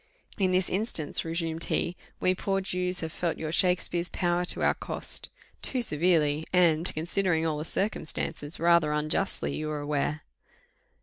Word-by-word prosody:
"In 190 -2 +2
this 185 -1 +2
instance," 185 -6 0
resumed 165 0 -3
he, 175 - -1 0.2
"we 185 - +3
poor 195 +1 -1
Jews 180 -1 0
have 160 -1 -4
felt 170 0 -2
your 155 -1 -4
Shakspeare's 175 -1 +1
power 175 0 0
to - - 0
our - - +4
cost - - -1 0.3
too 255 -2 -1
severely, 155 -4 +2
and, 170 -2 +3
considering 165 +1 0
all 155 -2 -1
the 155 - -4
circumstances, 165 -5 -1
rather 170 -3 +4
unjustly, 155 +6 -1
you 155 0 -3
are 150 -1 -3
aware." 145 +1 -1
170 Hz, 150 wpm, -28 LUFS, 155-180 Hz, 0.3 s, our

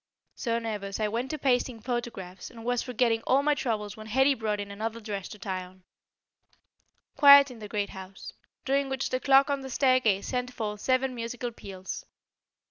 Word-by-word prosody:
So 230 -2 -1
nervous, 210 -4 -4
I 215 - +1
went 235 +5 -2
to 310 - -3
pasting 250 -3 +1
photographs, 230 -6 -5
and 230 -2 -12
was 245 0 +1
forgetting 235 -2 +1
all 275 +2 +4
my 300 0 +3
troubles 210 -6 -2
when 215 0 -10
Hetty 265 +5 +4
brought 215 -4 -2
in 200 0 -5
another 220 +3 -4
dress 205 -4 -5
to 210 - -10
try 190 -2 -4
on. 185 0 -16 1.3
Quiet 280 -1 +8
in 240 - -11
the 210 - -7
great 205 -1 -2
house, 190 0 -9 0.3
during 275 0 +1
which 265 0 -2
the 255 - 0
clock 275 +1 +5
on 280 -1 -1
the 265 - -7
staircase 255 -6 +2
sent 250 -1 -2
forth 210 -3 -4
seven 260 0 +1
musical 240 +1 -4
peals. 190 -4 -7
230 Hz, 185 wpm, -28 LUFS, 210-260 Hz, 1.3 s, Quiet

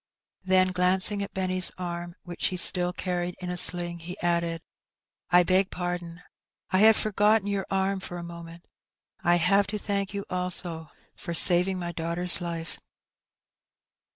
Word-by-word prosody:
Then, 185 0 +3
glancing 185 +3 +1
at 200 - -7
Benny's 185 -1 +2
arm, 175 -1 -6
which 175 -1 -3
he 185 - -5
still 180 0 +5
carried 180 -1 -4
in 180 -1 -6
a - - -4
sling, 175 -1 +3
he 175 +2 -9
added, 170 -1 -2 0.3
" - - -67 0.3
I 180 0 +5
beg 185 +2 +1
pardon, 175 -1 -6 0.5
I 185 - +2
had 220 +1 +6
forgotten 210 0 +1
your 200 -1 -3
arm 195 0 -1
for 175 -1 -8
a 175 - -7
moment. 170 0 -11 0.6
I 175 - +3
have 195 +3 +2
to 210 +1 -4
thank 200 -1 -3
you 200 - -5
also 180 -3 -4 0.3
for 170 - -7
saving 180 +3 +5
my 175 -1 -5
daughter's 170 +2 +2
life." 165 -2 -6
180 Hz, 155 wpm, -26 LUFS, 175-190 Hz, 0.6 s, had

